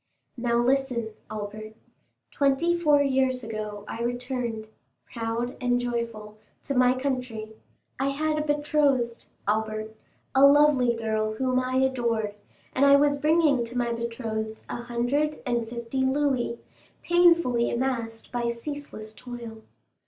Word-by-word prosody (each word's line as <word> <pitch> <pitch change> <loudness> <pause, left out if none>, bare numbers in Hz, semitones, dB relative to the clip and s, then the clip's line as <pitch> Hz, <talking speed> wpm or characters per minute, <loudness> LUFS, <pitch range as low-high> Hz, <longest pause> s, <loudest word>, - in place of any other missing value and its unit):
"Now, 235 -1 0
listen, 250 -2 +1 0.2
Albert. 215 +1 -6 0.6
Twenty 285 +5 +2
four 300 -4 +4
years 260 -2 +1
ago 215 -2 -5
I 230 - -5
returned, 245 -2 -3 0.4
proud 230 +2 -3
and 245 0 +2
joyful, 230 -3 -4 0.2
to 280 - -3
my 255 0 +4
country. 250 -5 -3 0.5
I 270 - +1
had 305 +2 0
a - - +1
betrothed, 295 -5 +1 0.2
Albert, 215 +1 -1 0.4
a 265 - +5
lovely 280 -4 +6
girl 220 -1 -1
whom 255 +2 +1
I 255 0 -2
adored, 235 -5 +1 0.4
and 265 - +2
I 280 0 +8
was 285 0 +4
bringing 300 -3 +3
to 235 +1 -6
my 240 -1 0
betrothed 230 -2 -4
a - - -4
hundred 245 +6 -1
and 240 -3 -1
fifty 235 +2 -3
louis, 265 -3 +1 0.5
painfully 340 -9 +4
amassed 235 -3 -3
by 240 -1 -1
ceaseless 235 -3 -6
toil. 235 -2 -9
245 Hz, 130 wpm, -26 LUFS, 230-275 Hz, 0.6 s, I